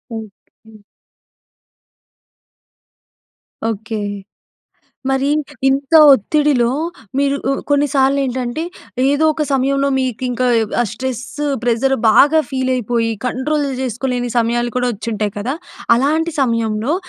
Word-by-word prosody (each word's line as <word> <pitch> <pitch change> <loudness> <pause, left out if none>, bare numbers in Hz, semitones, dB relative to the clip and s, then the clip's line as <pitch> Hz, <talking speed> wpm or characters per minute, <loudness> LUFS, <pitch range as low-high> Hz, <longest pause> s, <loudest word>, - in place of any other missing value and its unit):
Okay. 220 +1 -12 3.0
Okay. 220 0 -3 1.1
మరి 270 +1 +1 0.4
ఇంత 275 +3 -1 0.2
ఒత్తిడిలో 265 0 +1 0.5
మీరు 280 0 +2
ఉ - - +2 0.2
కొన్నిసార్లు 280 -1 +2
ఏంటంటే, 255 +3 -3 0.5
ఏదో 290 +2 +2
ఒక 305 - -2
సమయంలో 275 +1 +1
మీకింక 255 0 -2 0.4
ఆ - - +4
స్ట్రెస్సు 260 +4 -5 0.2
ప్రెజర్ 245 +3 +1
బాగా 295 +8 +5
ఫీలైపోయి, 245 -3 0 0.2
కంట్రోల్ 285 +4 -1
చేసుకోలేని 245 0 -2
సమయాలు 240 +1 0
కూడా 250 0 +1
వచ్చింటాయి 210 -1 -3
కదా! 250 +7 -2 0.4
అలాంటి 315 +6 +1
సమయంలో 230 +2 0
255 Hz, 90 wpm, -17 LUFS, 230-275 Hz, 3.0 s, బాగా